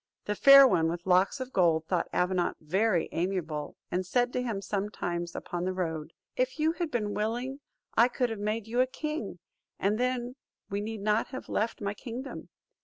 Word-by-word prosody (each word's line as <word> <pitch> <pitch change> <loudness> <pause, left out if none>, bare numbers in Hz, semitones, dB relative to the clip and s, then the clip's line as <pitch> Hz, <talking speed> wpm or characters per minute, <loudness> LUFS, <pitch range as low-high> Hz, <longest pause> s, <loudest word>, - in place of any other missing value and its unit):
The 210 - 0
Fair 275 +5 +9
One 165 -9 +2
with 170 +1 -4
Locks 185 +7 +3
of 260 0 -6
Gold 165 -4 +3
thought 175 +1 0
Avenant 180 -1 0
very 185 +3 +1
amiable, 165 -4 -2 0.2
and 180 +1 0
said 245 +6 +1
to 250 - 0
him 230 -5 -2
sometimes 190 -4 -3
upon 175 0 -4
the 185 +1 -1
road, 160 -3 -3 0.2
"If 255 +2 0
you 315 +1 +2
had 340 -1 -3
been 215 -6 -1
willing, 240 +6 -2 0.4
I 235 +2 +6
could 250 -1 -1
have 220 - -4
made 210 +1 -2
you 240 +3 +1
a 255 - +3
king; 275 - -4 0.4
and 205 +3 0
then 250 0 -1 0.3
we 200 +1 -1
need 220 0 -5
not 210 +2 +1
have 260 - -8
left 220 +1 -1
my 200 0 -1
kingdom." 250 +4 -7
210 Hz, 185 wpm, -29 LUFS, 180-250 Hz, 0.4 s, Fair